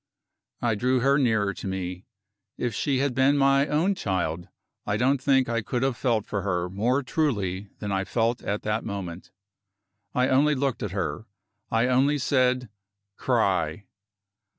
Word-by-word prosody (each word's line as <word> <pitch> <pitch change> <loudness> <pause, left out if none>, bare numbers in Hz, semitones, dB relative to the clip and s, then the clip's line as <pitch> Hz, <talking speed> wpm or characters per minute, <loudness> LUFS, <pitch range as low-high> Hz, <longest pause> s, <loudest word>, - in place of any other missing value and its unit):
I 120 -2 +2
drew 125 +4 +1
her 140 +3 +3
nearer 110 -6 +2
to 95 - -7
me. 90 -1 -4 0.5
If 120 -2 -2
she 135 +5 0
had 135 0 0
been 135 +3 +3
my 140 +1 +4
own 165 +7 +2
child, 90 - -2 0.4
I 105 0 -1
don't 130 +2 +2
think 135 -1 +3
I 115 -1 0
could 120 +3 -2
have 135 -2 +1
felt 115 -5 0
for 100 - -3
her 90 -2 -1
more 120 +8 +1
truly 105 - -1
than 105 - -4
I 95 0 0
felt 115 +2 0
at 105 +1 -3
that 105 +1 -1
moment. 90 -4 -6 0.9
I 125 +1 +3
only 145 +3 +3
looked 135 -2 -1
at 105 - -2
her; 95 0 -3 0.4
I 115 +2 +2
only 130 +4 +3
said: 130 -2 +1 0.5
"Cry!" 100 -7 0
120 Hz, 160 wpm, -26 LUFS, 100-135 Hz, 0.9 s, my